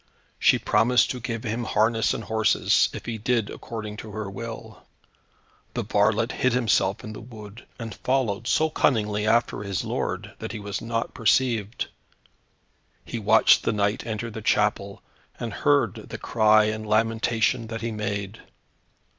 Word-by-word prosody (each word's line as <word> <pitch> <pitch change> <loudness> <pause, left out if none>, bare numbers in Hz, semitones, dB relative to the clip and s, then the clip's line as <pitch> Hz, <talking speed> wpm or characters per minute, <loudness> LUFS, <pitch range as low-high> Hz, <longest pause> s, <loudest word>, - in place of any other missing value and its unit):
She - - +5
promised 120 0 +3
to 125 - -5
give 115 -1 -4
him 115 +1 -2
harness 110 +1 +2
and 115 - -3
horses, 110 -1 +2
if - - -8
he 115 -2 -4
did 115 -1 0
according 105 -2 -7
to 110 - -8
her 105 -2 -5
will. 115 +2 -8 0.9
The - - -1
varlet - - +2
hid 130 -1 +1
himself 110 -5 +1
in 110 - -7
the - - -9
wood, 110 -2 -12
and 115 -3 -6
followed 115 -2 -1
so 155 +4 +2
cunningly 105 -7 +1
after 115 -1 +2
his 100 -2 -3
lord, - - -3
that - - -6
he 110 - -5
was 100 -1 -5
not 115 0 -3
perceived. 115 -1 +1 1.2
He - - -5
watched - - +5
the - - 0
knight 105 +1 0
enter 115 0 -4
the 110 - -7
chapel, 105 -2 0 0.4
and - - -4
heard 70 - +2 0.2
the - - -5
cry 110 -1 +4
and 110 0 -2
lamentation 115 +2 +1
that 115 +1 -5
he 115 0 -2
made. 100 -1 -4
110 Hz, 155 wpm, -25 LUFS, 105-115 Hz, 1.2 s, She